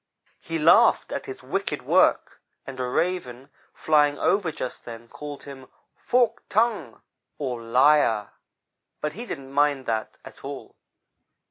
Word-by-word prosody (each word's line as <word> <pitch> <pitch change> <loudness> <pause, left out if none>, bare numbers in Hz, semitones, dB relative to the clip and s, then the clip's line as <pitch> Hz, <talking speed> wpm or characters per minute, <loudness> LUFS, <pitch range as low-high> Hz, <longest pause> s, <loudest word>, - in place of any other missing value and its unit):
He 165 0 -4
laughed 160 +2 +5
at - - -4
his - - -8
wicked - - -3
work, - - +2 0.2
and 135 -1 -8
a 125 - -1
Raven, 135 -4 -2 0.2
flying 150 -2 +2
over 195 -4 +1
just 130 -4 -6
then, 115 0 -10
called 145 +2 -9
him 135 -2 -11 0.3
'forked 240 -2 0
tongue,' 225 +1 0 0.3
or 125 -5 -4
liar, 120 -2 +3 0.7
but 150 0 -3
he 235 +7 -8
didn't 135 -7 -7
mind 145 -2 +2
that 110 -1 -3
at - - -13
all. - - -8
145 Hz, 135 wpm, -25 LUFS, 125-165 Hz, 0.7 s, laughed